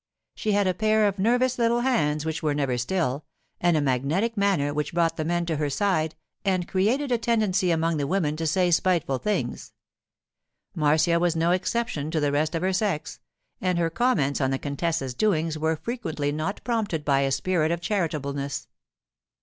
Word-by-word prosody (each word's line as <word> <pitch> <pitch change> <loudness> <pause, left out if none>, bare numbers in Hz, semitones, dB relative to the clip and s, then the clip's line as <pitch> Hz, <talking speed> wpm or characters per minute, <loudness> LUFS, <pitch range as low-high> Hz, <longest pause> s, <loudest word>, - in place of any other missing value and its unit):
She 215 - -1
had 205 0 +3
a 185 - +2
pair 215 +2 +2
of 200 -1 -2
nervous 245 +4 +2
little 235 0 +2
hands 155 - +1
which 160 0 -2
were 150 -2 0
never 135 -4 0
still, 140 +2 -1 0.4
and 175 -2 +3
a - - +2
magnetic 145 - 0
manner 195 -9 +1
which 150 +3 -3
brought 170 -1 +2
the 155 - -2
men 175 +2 0
to 165 -2 -1
her 145 -1 -1
side 160 -1 0 0.3
and 185 -3 0
created 245 +9 +1
a 240 - +2
tendency 215 -6 +1
among 165 -1 +1
the 140 -1 -1
women 160 -3 0
to 165 0 -1
say 180 +2 +2
spiteful 165 -6 +1
things. 210 +7 -3 1.0
Marcia 160 +1 +3
was 175 -1 +1
no 165 +1 +2
exception 180 -5 -1
to 160 - 0
the 145 -1 +1
rest 155 +3 0
of 165 - -2
her 190 0 +1
sex, 190 -5 -2 0.4
and 185 -1 +1
her 165 -1 +1
comments 155 - +1
on 130 - +2
the 135 - 0
contessa's 140 -1 -2
doings 165 -2 +1
were 160 +1 0
frequently 155 - -3
not 155 +7 -3
prompted 210 -10 -1
by 140 -2 +3
a 135 0 +1
spirit 160 +2 +1
of 170 0 -1
charitableness. 150 -8 -2
165 Hz, 185 wpm, -25 LUFS, 150-200 Hz, 1.0 s, had